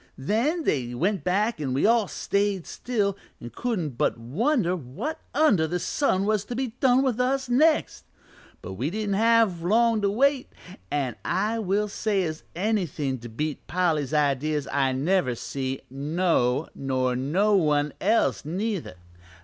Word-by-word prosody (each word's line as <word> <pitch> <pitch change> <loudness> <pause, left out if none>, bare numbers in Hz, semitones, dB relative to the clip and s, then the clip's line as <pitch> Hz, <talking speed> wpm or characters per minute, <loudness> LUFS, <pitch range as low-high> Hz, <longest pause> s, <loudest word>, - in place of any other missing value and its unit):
Then 235 - 0
they 125 - -1
went 185 +5 0
back 205 +4 0
an' 130 -3 -2
we 135 - +2
all 225 -2 +4
stayed 200 -2 -1
still 205 -5 -1 0.2
an' 120 - -9
couldn't 175 - -3
but - - +1
wonder 180 - 0
what 165 - -5
under 240 - +3
the 180 - -1
sun 195 - 0
was 215 -1 +1
to 240 - -5
be 260 0 -1
done 260 0 +4
to 250 -2 +1
us 265 +1 0
next. 305 +6 +2 0.6
But 95 - -6
we 125 +10 -2
didn't 210 +2 -2
have 225 -4 +3
long 225 +4 +3
to 200 - +2
wait, 265 +5 +1 0.4
an' 130 -6 -2
I 215 +4 0
will 210 0 0
say 200 -1 -1
as 155 -2 -4
anythin' 170 - -1
to 120 +1 -9
beat 150 +6 -4
Polly's 160 -6 0
ideas 150 -1 0
I 135 -1 +2
never 140 -1 +1
see 130 +2 -4
no 145 -2 0
nor 130 -2 -1
no 180 +12 +2
one 150 -5 +2
else 220 +4 +2
neither. 185 - -3
185 Hz, 155 wpm, -25 LUFS, 140-225 Hz, 0.6 s, all